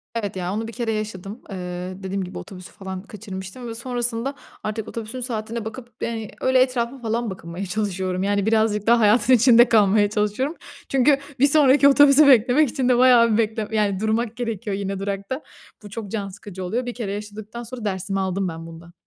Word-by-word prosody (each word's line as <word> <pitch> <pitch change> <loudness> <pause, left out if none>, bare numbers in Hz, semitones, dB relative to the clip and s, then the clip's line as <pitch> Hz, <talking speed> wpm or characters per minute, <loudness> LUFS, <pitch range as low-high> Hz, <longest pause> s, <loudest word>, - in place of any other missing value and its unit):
Evet, 205 -4 -3
ya, 180 0 -3
onu 225 +2 -3
bir 230 - -8
kere 235 -2 -2
yaşadım. 215 0 -5
Eee, 180 -1 -5
dediğim 190 0 -2
gibi 180 - -8
otobüsü 185 -2 -10
falan 190 -2 -7
kaçırmıştım 205 +2 -8
ve 225 - -6
sonrasında 240 +2 -2 0.3
artık 215 0 -4
otobüsün 230 +2 -6
saatine 230 -2 -4
bakıp, 235 +2 -8
eee, 225 -2 -4
öyle 260 0 +4
etrafa 255 0 0
falan 230 0 -2
bakınmaya 180 0 -6
çalışıyorum. 190 -1 -2
Yani, 200 0 +1
birazcık 220 -1 +1
daha 235 0 +5
hayatın 215 +3 +4
içinde 240 0 +6
kalmaya 205 -1 +4
çalışıyorum. 210 +9 -1 0.3
Çünkü 270 +1 +4 0.2
bir 280 - +6
sonraki 280 -1 +5
otobüsü 285 +1 +7
beklemek 260 +3 +5
için 260 -2 -1
de 245 - +4
bayağı 245 -2 +6
bir - - +2
bekle 220 -1 0
yani, 205 -3 +1
durmak 220 +1 -1
gerekiyor 225 -4 -3
yine 195 -1 -3
durakta. 200 +7 -4 0.4
Bu 205 - -10
çok 205 -1 -7
can 200 -3 -3
sıkıcı 190 -1 -9
oluyor. 235 +8 -2
1 245 - -4
kere 220 -5 -4
yaşadıktan 210 +3 -7
sonra 240 -1 -8
dersimi 195 0 -2
aldım 190 0 -1
ben 165 0 -7
bundan. 170 +1 -12
220 Hz, 185 wpm, -22 LUFS, 195-240 Hz, 0.4 s, otobüsü